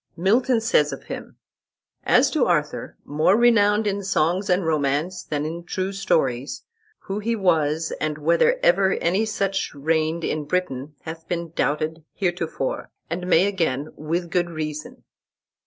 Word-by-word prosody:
Milton 230 +7 +3
says 150 -10 +3
of - - -7
him: - - -8 0.7
"As - - +4
to - - +2
Arthur, - - -1
more 155 +7 +3
renowned 220 -3 +4
in 200 -1 -1
songs 185 +1 +1
and 180 0 +2
romances 155 +3 0
than 150 -1 -1
in 165 +2 -5
true 185 +2 -3
stories, 140 -9 0 0.4
who 195 +2 -4
he 230 +2 -1
was, 160 -5 +1
and 155 -1 -1
whether 170 - +3
ever 190 +2 +4
any 190 +6 +1
such 195 -5 -1
reigned 160 +3 0
in 155 -1 -2
Britain, 145 -4 -2
hath 160 0 -8
been 170 -2 -3
doubted 155 0 -1
heretofore, 175 -7 -2 0.2
and 180 +1 -3
may 180 0 +5
again, 160 -8 -1
with 165 +3 -3
good 175 -1 +1
reason." 155 -2 -6
170 Hz, 145 wpm, -23 LUFS, 155-195 Hz, 0.7 s, may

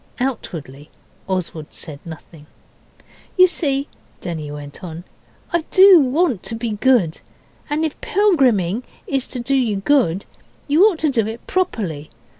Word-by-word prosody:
Outwardly 155 - -5 0.4
Oswald 175 -5 -3
said 145 -3 -7
nothing. 160 -1 -12 0.9
'You 365 - +9
see' 280 -5 -1 0.3
Denny 160 -4 -5
went 145 +1 -9
on 170 -1 -7 0.5
'I 340 - +2
do 380 -2 +8
want 275 - +1
to 230 - -4
be 230 0 -3
good. 210 -6 +2 0.5
And 305 +2 0
if 310 - -5
pilgriming 255 - +2 0.2
is 270 -2 -1
to 255 - -5
do 255 +3 0
you 240 -6 +1
good, 195 - +1 0.4
you 305 +5 +4
ought 390 -6 0
to 300 - +3
do 225 -5 +1
it 225 +2 -7
properly. 195 - -2
235 Hz, 140 wpm, -20 LUFS, -, 0.9 s, You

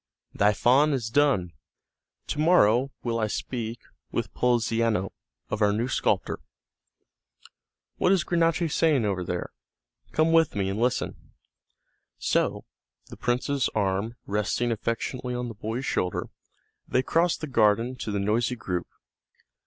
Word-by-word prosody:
"Thy 105 +1 +4
faun 135 +8 +4
is 115 -5 -2
done; 130 -11 +2 0.7
to 150 - -4
morrow 135 -6 +4
will 115 -1 -1
I 110 - +1
speak 115 +1 -4 0.3
with - - -3
Poliziano 115 -4 +1 0.4
of 110 - -2
our 105 -1 +4
new 110 +4 0
sculptor. 135 - 0 1.6
What 180 - +3
is 190 -4 +3
Granacci 165 +1 +1
saying 150 -6 +2
over 95 -3 -1
there? 90 0 -4 0.6
Come 160 +1 +2
with 165 -5 +4
me 95 -2 0
and 100 +2 -3
listen." 125 +2 -2 0.8
So, - - 0 0.4
the - - -9
prince's 125 +3 0
arm 100 +2 0
resting 105 +4 0
affectionately 120 +3 -3
on 125 0 -3
the - - -6
boy's 110 +5 -4
shoulder, 90 -8 -1 0.6
they 130 - +1
crossed 170 +4 +1
the - - -2
garden 115 -1 +2
to 115 - -5
the 100 - -1
noisy 115 +5 +1
group. 95 -5 -3
120 Hz, 135 wpm, -26 LUFS, 105-135 Hz, 1.6 s, Thy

